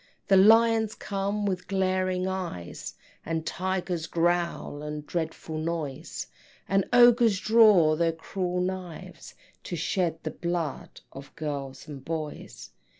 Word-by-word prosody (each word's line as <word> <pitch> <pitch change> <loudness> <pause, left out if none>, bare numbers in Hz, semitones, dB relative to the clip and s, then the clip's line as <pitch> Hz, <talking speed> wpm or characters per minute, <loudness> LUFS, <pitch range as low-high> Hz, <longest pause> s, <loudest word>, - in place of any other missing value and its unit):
Then 195 0 +7
lions 225 -1 +4
come 200 +1 -2
with 185 -2 -2
glaring 185 -1 0
eyes, 180 - -5 0.3
And 165 0 -3
tigers 180 -2 -2
growl, 170 -3 0
a 150 0 -5
dreadful 160 0 -4
noise, 155 -4 -4 0.4
And 195 0 +2
ogres 240 -4 +6
draw 210 -9 +5
their 165 +1 +2
cruel 180 +2 -3
knives, 180 -2 -6 0.3
To 175 - -4
shed 165 0 -1
the - - -3
blood 170 -4 -4
of 135 +1 -12
girls 145 -3 -5
and 140 -3 -9
boys. 155 -1 -6
175 Hz, 120 wpm, -27 LUFS, 160-190 Hz, 0.4 s, Then